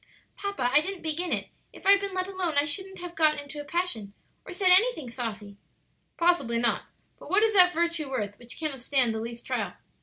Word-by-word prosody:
"Papa, 400 -12 -1
I 295 - +7
didn't 380 +2 -6
begin 325 +3 -1
it; - - -2 0.2
if - - -15
I'd 395 +1 +7
been 395 -1 -5
let 370 0 -1
alone 365 -6 -2
I 285 - +4
shouldn't 380 +5 -3
have 355 -1 -7
got 310 -3 +2
in 285 +1 -8
a - - -8
passion 290 - -3 0.3
or - - -9
said 370 0 +2
anything 370 - +3
saucy." 215 -4 -6 0.6
"Possibly 340 -9 +3
not; 235 0 0 0.3
but - - -12
what 405 +3 +3
is 445 -1 +3
that 365 -3 +8
virtue 335 -3 -1
worth 210 -6 -3
which 240 0 -9
cannot 305 -4 -4
stand 250 -3 +2
the 220 - -3
least 235 +1 -7
trial? - - -2
315 Hz, 210 wpm, -27 LUFS, 245-370 Hz, 0.6 s, that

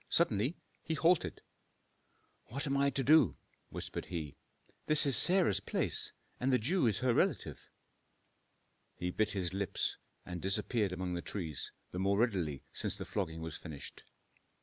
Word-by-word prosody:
Suddenly 125 - +2 0.2
he 160 - -2
halted. 165 +1 +2 1.0
"What 140 +7 -4
am 135 -1 0
I 140 0 +3
to 140 -1 -1
do?" 130 - +5 0.3
whispered - - -5
he. 80 -5 -5 0.5
"This 155 -1 +6
is 140 -3 +2
Sarah's 180 - +4
place, - - -1 0.3
and 130 +2 +1
the 130 - +5
Jew 140 - +2
is 105 -4 +2
her 125 - +4
relative." - - 0 1.3
He 90 0 -3
bit 110 +2 +1
his 95 -3 -1
lips, 100 0 -1 0.3
and 90 -1 -6
disappeared 105 +1 +1
among 90 0 -3
the 85 - -2
trees, 80 -7 -4 0.2
the 90 - -4
more 100 +1 +2
readily 95 - 0
since - - +1
the - - -5
flogging 80 -6 -3
was 80 -1 -5
finished. 75 -5 -9
105 Hz, 150 wpm, -34 LUFS, 90-135 Hz, 1.3 s, This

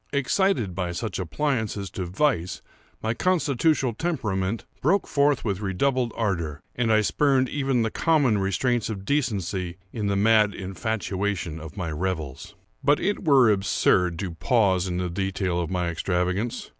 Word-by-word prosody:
Excited 140 - +1
by 90 -1 -3
such 110 +4 -4
appliances 105 - -2
to 95 -2 -4
vice, 90 - 0 0.4
my 110 +1 0
constitutional 145 -4 +1
temperament 110 - -2 0.2
broke 185 +8 +2
forth 140 -2 +2
with 100 -4 -1
redoubled 120 +5 0
ardor, 85 -9 -2
and 115 -2 0
I 110 0 +5
spurned 135 +3 +2
even 135 -4 0
the 110 - -1
common 145 -10 +2
restraints 110 +5 0
of 100 -3 -5
decency 100 - -1 0.2
in 105 -3 -2
the 100 - +1
mad 105 0 +4
infatuation 95 -3 -3
of 80 +4 -10
my 85 -4 -3
revels. 80 -5 -4 0.3
But 145 +2 +4
it 205 +1 -1
were 135 -7 +6
absurd 95 -3 +2
to 95 -1 -4
pause 95 0 +2
in 90 -1 -2
the 90 0 -1
detail 95 0 -1
of 85 - -3
my 90 -2 -1
extravagance. 90 +7 -1
105 Hz, 150 wpm, -25 LUFS, 90-130 Hz, 0.4 s, were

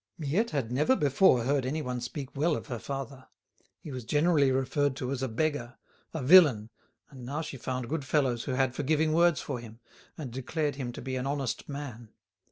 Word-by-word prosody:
Miette 165 +10 0
had 130 -6 -2
never 150 - +3
before 140 - +4
heard 135 +2 +1
anyone 130 -2 -3
speak 135 +3 -6
well 155 +3 +2
of - - -6
her 120 -3 -3
father. 135 0 -6 0.5
He 150 - -9
was 130 -2 -5
generally 145 +2 +3
referred 135 +1 +1
to 130 -1 -4
as 135 -2 -3
a 130 - 0
beggar, 130 0 -2 0.3
a 160 -5 -4
villain, 130 - +6 0.4
and 130 -3 -11
now 140 +5 -3
she 150 -3 -6
found 125 0 -4
good 155 +1 -2
fellows 130 -4 0
who 135 - -2
had 130 -1 +1
forgiving 155 +3 +1
words 170 -2 +4
for 130 -4 -4
him, 115 -1 -11 0.4
and 140 -6 -6
declared 145 +4 -2
him 125 -3 -4
to - - -8
be 130 -1 -3
an 130 +1 -2
honest 140 -2 -3
man. 130 -6 -7
135 Hz, 195 wpm, -29 LUFS, 125-150 Hz, 0.5 s, villain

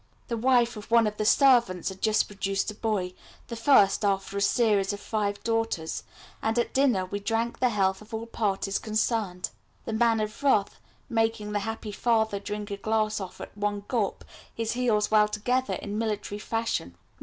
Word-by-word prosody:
The 235 - 0
wife 240 0 +3
of 210 -1 -9
one 230 -1 +5
of 210 0 -2
the 215 - -1
servants 240 - +4
had 190 0 -10
just 215 -1 +3
produced 195 0 -2
a - - -9
boy, 205 -4 -2 0.4
the 235 - -4
first 225 -5 +4
after 195 -1 0
a 200 - -1
series 205 -3 +2
of 205 - -6
five 205 -1 -2
daughters, 225 -8 -1 0.4
and 220 +1 0
at 240 - 0
dinner 250 -9 +3
we 200 +2 -4
drank 225 +3 -1
the 250 - +3
health 190 -3 +1
of 215 +2 -15
all 225 0 -4
parties 200 -3 -1
concerned, 215 -4 -1 0.3
the 225 - -3
Man 225 0 +3
of 215 +3 -4
Wrath 240 -8 +2 0.3
making 225 -2 0
the 205 - 0
happy 220 +1 -5
father 220 -1 +1
drink 210 +1 -5
a 200 - -3
glass 215 +1 0
off 190 -2 -7
at - - -9
one 205 0 -2
gulp, 225 -6 -1 0.3
his 225 -1 -2
heels 225 -4 +1
well 210 -1 +5
together 250 +5 -1
in 205 +1 -4
military 210 -2 -3
fashion. 225 - -2
215 Hz, 185 wpm, -27 LUFS, 205-230 Hz, 0.4 s, one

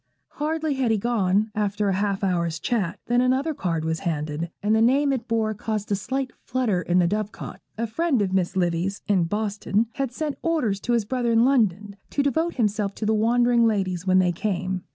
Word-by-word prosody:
Hardly 310 0 0
had 265 -3 0
he 220 - +3
gone, 210 -2 +1
after 210 0 0
a - - +1
half 200 +1 -1
hour's 170 -3 0
chat, 200 -4 -1
than 245 +1 +2
another 260 +5 +1
card 165 - -2
was 160 0 -1
handed, 155 -1 -3
and 215 +1 +3
the 220 - +3
name 275 +4 +3
it 245 -2 -3
bore 225 -1 0
caused 215 0 -4
a - - +3
slight 260 +6 -3
flutter 240 -8 0
in 175 0 +1
the 180 - +4
dove 210 +3 -1
cot. - - -9 0.2
A 230 - -1
friend 275 +4 0
of 190 -1 -2
Miss 185 -1 0
Livy's, 180 +2 -1
in 190 -4 +3
Boston, 210 +2 0
had 270 -3 -1
sent 295 +2 -4
orders 275 -13 0
to 240 - -1
his 230 -3 +1
brother 240 +1 0
in 230 +1 +4
London 210 -6 +1
to 280 - 0
devote 320 +5 0
himself 210 -3 0
to 215 - -4
the 220 - +2
wandering 235 +2 +3
ladies 190 -4 -1
when 185 0 +4
they 180 -1 +4
came. 185 0 -2
215 Hz, 210 wpm, -24 LUFS, 190-245 Hz, 0.2 s, the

